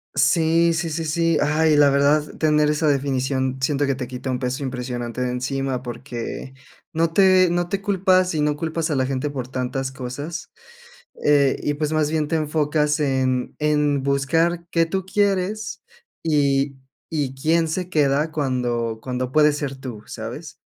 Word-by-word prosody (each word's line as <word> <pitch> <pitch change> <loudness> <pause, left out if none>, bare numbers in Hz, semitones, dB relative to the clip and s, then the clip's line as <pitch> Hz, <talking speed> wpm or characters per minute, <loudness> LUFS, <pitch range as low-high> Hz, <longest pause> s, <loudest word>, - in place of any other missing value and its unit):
Sí, 165 0 +3
sí, 165 0 -2
sí, 165 +1 -3
sí. 165 +1 +1
Ay, 155 +1 +3
la 145 -1 +6
verdad, 145 +2 +2
tener 150 -1 +3
esa 150 +1 +1
definición 130 -2 0
siento 140 +1 +1
que 140 - +1
te 125 -1 -5
quita 125 +1 -6
un 130 - 0
peso 125 +2 -3
impresionante 125 -2 -4
de 125 0 0
encima. 130 0 -2
Porque 120 +1 -6 0.4
no 165 0 +1
te 185 0 +5
no 175 0 0
te 195 +2 -2
culpas, 185 -3 +2
y 150 - +1
no 150 0 +1
culpas 160 +1 -2
a - - +1
la 130 -1 +1
gente 135 +2 -2
por 130 -3 -5
tantas 130 +1 -3
cosas, 135 +6 -6 0.7
eh, 140 -2 +3
y 145 - -1
pues, 150 0 -2
más 155 -1 +1
bien 155 -1 0
te 165 - -1
enfocas 150 0 +1
en 130 -3 0
en 150 -2 +2
buscar 165 +5 +1
qué 165 -1 +2
tú 190 +2 -2
quieres 200 +1 -1 0.4
y 140 -3 +1 0.3
y 145 -4 -2
quién 165 +3 +2
se 180 +3 -3
queda 150 0 +2
cuando 120 -6 -1
cuando 125 0 -3
puedes 150 0 +4
ser 135 -2 -3
tú, 125 -5 -8
¿sabes? - - -7
145 Hz, 170 wpm, -22 LUFS, 130-160 Hz, 0.7 s, la